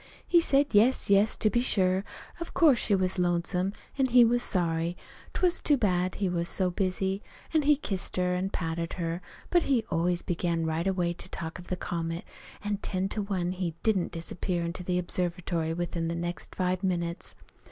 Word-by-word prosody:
He 345 -1 +5
said 285 -3 +4
yes, 220 +1 +4
yes, 200 +2 +5
to 215 - +2
be 240 - +2
sure, 190 -5 +2 0.4
of 335 - -7
course 295 -8 +5
she 205 - +3
was 185 -1 0
lonesome, 180 +2 +1 0.3
an' 265 - +4
he 245 -1 +7
was 240 +1 +2
sorry. 170 -3 0 0.4
'T - - -3
was 355 -1 +4
too 290 - +3
bad 185 -5 +1
he 200 - 0
was 170 -1 -1
so 185 -2 +1
busy. 190 +1 -1 0.3
An' 315 - +4
he 295 +1 +5
kissed 195 -9 -3
her 180 0 +1
an' 185 +2 -1
patted 165 -2 -3
her. 170 0 -3 0.3
But 350 - +5
he 250 -5 +2
always 175 +1 +1
began 170 -1 -1
right 160 +3 -1
away 180 -3 +1
to 175 - -8
talk 165 -1 -5
of 180 - -11
the 180 - -2
comet; 165 -1 -3 0.4
an' 205 0 -1
ten 190 -1 -2
to 215 - -2
one 185 -3 -1
he 180 -3 -3
didn't 205 -5 +1
disappear 170 +1 -2
into 170 +2 -4
the 180 0 -1
observatory 175 -2 -1
within 170 0 -2
the 165 - -2
next 175 +1 -4
five 185 0 0
minutes. 170 -2 -2
180 Hz, 195 wpm, -28 LUFS, 170-200 Hz, 0.4 s, he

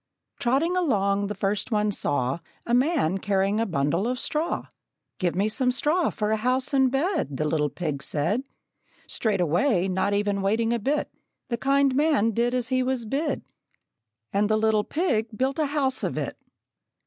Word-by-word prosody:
Trotting 280 +9 +1
along, 200 - +1
the 210 - -4
first 200 +3 -1
one 210 -1 +2
saw 140 -5 -1 0.3
A 235 - -1
man 250 - +2
who - - -7
carried 195 +2 +1
a 230 - +1
bundle 165 +5 0
of 250 +1 -1
straw. 315 +3 -1 0.5
"Give 175 -3 0
me 200 +3 +2
some 250 +3 +1
straw 305 +7 +1
for 210 0 -2
a 220 - +2
house 255 +5 0
and 265 -1 +4
bed," 285 - 0
The 155 - 0
little 150 -1 +1
pig 150 -5 -4
said. 175 - -1 0.6
Straightway, 185 - +1
not 190 +2 0
even 205 -1 0
waiting 225 +4 +1
a 235 - 0
bit, 285 +7 -1 0.4
The 235 - -1
kind 275 +2 +2
man 285 -6 +3
did 240 +3 0
as 250 -1 -1
he 255 -1 +2
was 255 -2 -1
bid; 275 +8 -1 0.9
And 205 +1 +2
the 215 - +3
little 215 -1 +2
pig 230 - -1
built 265 +3 0
a 305 - +2
house 275 -2 0
of - - -2
it. - - -3
225 Hz, 175 wpm, -25 LUFS, 195-270 Hz, 0.9 s, and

